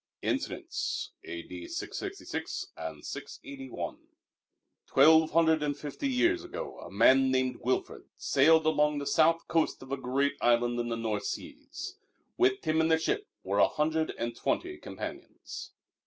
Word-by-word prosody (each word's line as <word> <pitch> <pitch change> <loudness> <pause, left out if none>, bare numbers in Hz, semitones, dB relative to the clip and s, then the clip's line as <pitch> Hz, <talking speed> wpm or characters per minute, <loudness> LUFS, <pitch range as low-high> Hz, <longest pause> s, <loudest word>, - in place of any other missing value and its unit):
Incidents - - -2
A.D. 85 +1 -7
666 - - -5
and 80 -2 -7
681) 135 -2 -6 0.9
Twelve 160 0 +6
hundred 160 -1 +4
and 145 -1 -1
fifty 145 - -4
years 340 +8 +2
ago 445 +8 -6
a - - -9
man 135 0 +5
named 130 0 +1
Wilfrid 130 +1 -1
sailed 160 +3 +4
along 150 -1 +3
the 140 - -3
south 165 +3 +3
coast 160 -4 +1
of 130 - -12
a 135 - 0
great 140 +2 0
island 120 0 +3
in 120 0 -1
the 115 - -1
North 110 -3 -2
Seas. - - -6 0.4
With 130 +1 +2
him 160 0 +3
in 160 - +3
the 160 0 +4
ship 415 - -1 0.2
were - - 0
a - - +7
hundred 160 +1 0
and 115 0 -3
twenty 360 - -2
companions. - - -8
145 Hz, 145 wpm, -30 LUFS, 125-160 Hz, 0.9 s, a